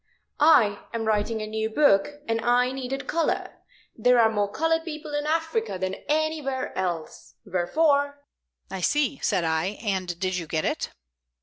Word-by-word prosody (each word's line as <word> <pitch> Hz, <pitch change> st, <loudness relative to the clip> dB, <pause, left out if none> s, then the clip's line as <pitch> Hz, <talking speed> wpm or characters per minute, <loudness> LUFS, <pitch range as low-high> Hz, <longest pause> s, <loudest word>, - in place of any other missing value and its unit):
I 235 Hz, -10 st, +5 dB, 0.2 s
am 225 Hz, -1 st, -2 dB
writing 215 Hz, +1 st, 0 dB
a -, -, -3 dB
new 220 Hz, 0 st, -2 dB
book, 290 Hz, +2 st, +2 dB
and 225 Hz, 0 st, 0 dB
I 245 Hz, +2 st, +3 dB
needed 270 Hz, +1 st, -4 dB
color. 335 Hz, -1 st, -1 dB, 0.4 s
There 245 Hz, +2 st, +4 dB
are 220 Hz, -1 st, +5 dB
more 205 Hz, -2 st, 0 dB
colored 325 Hz, +5 st, +1 dB
people 305 Hz, -2 st, -7 dB
in 295 Hz, 0 st, -1 dB
Africa 325 Hz, -, -1 dB
than 185 Hz, +1 st, -2 dB, 0.2 s
anywhere 300 Hz, -4 st, -1 dB
else. 175 Hz, -4 st, -4 dB
Wherefore 285 Hz, -, +1 dB, 0.2 s
" -, -, -31 dB
"I 190 Hz, -1 st, -4 dB
see," 285 Hz, +3 st, +1 dB
said 190 Hz, -5 st, +1 dB
I. 160 Hz, +5 st, 0 dB
"And 185 Hz, -5 st, -2 dB
did 185 Hz, -1 st, -1 dB
you 170 Hz, -3 st, -5 dB
get 155 Hz, 0 st, -1 dB
it?" -, -, -1 dB
230 Hz, 165 wpm, -25 LUFS, 195-295 Hz, 0.4 s, I